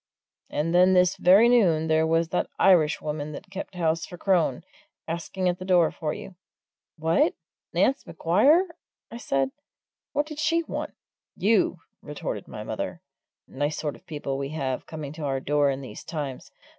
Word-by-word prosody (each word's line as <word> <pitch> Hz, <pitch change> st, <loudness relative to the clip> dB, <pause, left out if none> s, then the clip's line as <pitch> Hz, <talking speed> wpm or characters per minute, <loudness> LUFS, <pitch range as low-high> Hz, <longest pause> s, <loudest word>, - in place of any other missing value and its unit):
"And 160 Hz, +3 st, -1 dB
then 180 Hz, +1 st, +6 dB
this 180 Hz, -1 st, +4 dB
very 195 Hz, +6 st, +6 dB
noon 185 Hz, -10 st, +4 dB
there 160 Hz, 0 st, +2 dB
was 165 Hz, 0 st, +2 dB
that 180 Hz, -, -1 dB
Irishwoman 155 Hz, -4 st, +2 dB
that 190 Hz, +6 st, -10 dB
kept 195 Hz, -1 st, -7 dB
house 165 Hz, -2 st, 0 dB
for 175 Hz, -, -8 dB
Crone, 175 Hz, -7 st, +1 dB, 0.4 s
asking 170 Hz, +3 st, -2 dB
at 180 Hz, +1 st, 0 dB
the -, -, -6 dB
door 180 Hz, -3 st, +4 dB
for 155 Hz, -3 st, -3 dB
you." 190 Hz, -, -8 dB, 0.6 s
"What, 160 Hz, +2 st, +2 dB, 0.4 s
Nance 225 Hz, +11 st, +1 dB
Maguire!" 215 Hz, -, +4 dB, 0.5 s
I 230 Hz, -, -6 dB
said. 135 Hz, -, 0 dB, 0.6 s
"What 290 Hz, +1 st, 0 dB
did 305 Hz, -1 st, -8 dB
she 330 Hz, +2 st, +2 dB
want?" -, -, -5 dB, 0.4 s
"You!" 195 Hz, -4 st, +2 dB, 0.2 s
retorted 150 Hz, -1 st, -5 dB
my -, -, -7 dB
mother. -, -, -4 dB, 0.5 s
"Nice 145 Hz, +3 st, -2 dB
sort 150 Hz, -2 st, -3 dB
of -, -, -20 dB
people 145 Hz, -4 st, -4 dB
we 140 Hz, 0 st, -3 dB
have 135 Hz, -4 st, -3 dB
coming 150 Hz, -3 st, -6 dB
to 160 Hz, -, -9 dB
our 135 Hz, -2 st, -1 dB
door 145 Hz, +1 st, +2 dB
in 135 Hz, 0 st, -2 dB
these 130 Hz, -, -9 dB
times! 145 Hz, -5 st, -5 dB
165 Hz, 165 wpm, -26 LUFS, 150-190 Hz, 0.6 s, then